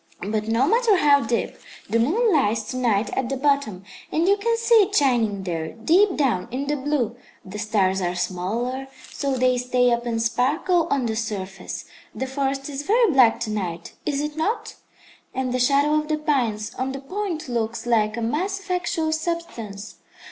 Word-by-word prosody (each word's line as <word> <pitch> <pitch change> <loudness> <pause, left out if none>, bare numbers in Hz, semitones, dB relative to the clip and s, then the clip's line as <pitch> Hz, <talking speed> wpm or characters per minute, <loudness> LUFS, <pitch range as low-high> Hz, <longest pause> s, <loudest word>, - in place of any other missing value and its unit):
But 215 0 -1
no 230 +4 +2
matter 455 -1 +4
how 285 -3 +5
deep, 235 -2 -2 0.3
the 230 +3 +1
moon 400 - +2
lies 225 -7 +2
to 255 - -4
night 230 -4 +1
at 260 -2 -1
the 270 - -2
bottom, 275 -9 0 0.3
and 330 +3 +1
you 400 - +5
can 460 +3 0
see 460 +1 +1
it 405 +1 0
shining 230 - +2
there, 165 -3 -3
deep 350 - +3
down 255 -11 +1
in 260 +4 -3
the 295 +1 0
blue. 265 -5 -1 0.3
The 195 +2 -7
stars 195 -3 +1
are 175 0 -1
smaller, 225 +10 -2 0.2
so 275 -2 -2
they 255 0 +2
stay 250 0 +2
up 235 0 0
and 230 -1 -1
sparkle 285 +10 +1
on 275 -3 +1
the 220 -1 -1
surface. 195 -4 -5 0.3
The 265 - -2
forest 270 0 -2
is 285 -1 -4
very 445 +6 +3
black 250 -5 +5
to 220 -2 -2
night, 175 -5 -4
is 285 -1 -1
it 300 0 -4
not? 365 +9 -2 0.6
and 260 -1 -1
the 255 - 0
shadow 280 +4 +3
of 305 0 +1
the 310 0 0
pines 240 -8 -1
on 265 +1 -1
the 270 - -5
point 350 +2 -4
looks 235 -1 -2
like 220 -2 +1
a 235 - -2
mass 365 - -1
of 385 -1 -8
actual 335 -3 0
substance. 280 - -4
255 Hz, 190 wpm, -23 LUFS, 225-300 Hz, 0.6 s, how